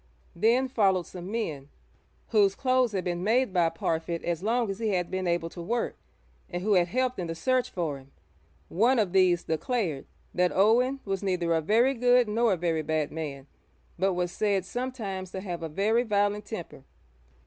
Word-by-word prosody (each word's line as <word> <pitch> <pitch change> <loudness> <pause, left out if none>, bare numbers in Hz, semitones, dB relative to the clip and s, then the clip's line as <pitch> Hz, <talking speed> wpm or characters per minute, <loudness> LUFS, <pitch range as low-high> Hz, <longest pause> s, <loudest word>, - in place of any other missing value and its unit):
Then 235 +8 +3
followed 195 -8 +2
some 180 0 -8
men, 155 -11 -4 0.6
whose 200 -3 +3
clothes 255 -2 +2
had 190 -2 -1
been 175 -1 -2
made 230 +1 +2
by 175 -3 +3
Parfitt 165 0 -2
as 170 -1 -2
long 230 +3 +1
as 195 - -7
he 225 - -1
had 180 -3 -1
been 185 -1 -2
able 170 -1 -1
to 175 - -8
work, 230 +7 -2 0.5
and 175 0 -4
who 210 +1 +2
had 175 -2 +4
helped 255 +5 -1
in 175 - -3
the 165 - -4
search 255 +7 +1
for 160 -6 -3
him. 135 0 -18 0.6
One 235 +8 +2
of 200 -5 +1
these 180 -2 +4
declared 165 - -2 0.3
that 180 0 +2
Owen 245 +7 +3
was 195 -1 -2
'neither 180 -4 0
a 160 - +2
very 230 - +3
good 245 -1 +4
nor 225 0 +2
a - - -1
very 165 -2 0
bad 155 0 -1
man, 145 -4 -6 0.5
but 190 +1 +2
was 175 0 -1
said 200 -3 0
sometimes 215 -6 -4
to 190 - -4
have 175 -4 -5
a 165 - -4
very 210 +9 +2
violent 205 -2 0
temper.' 175 - -7
190 Hz, 190 wpm, -27 LUFS, 170-230 Hz, 0.6 s, had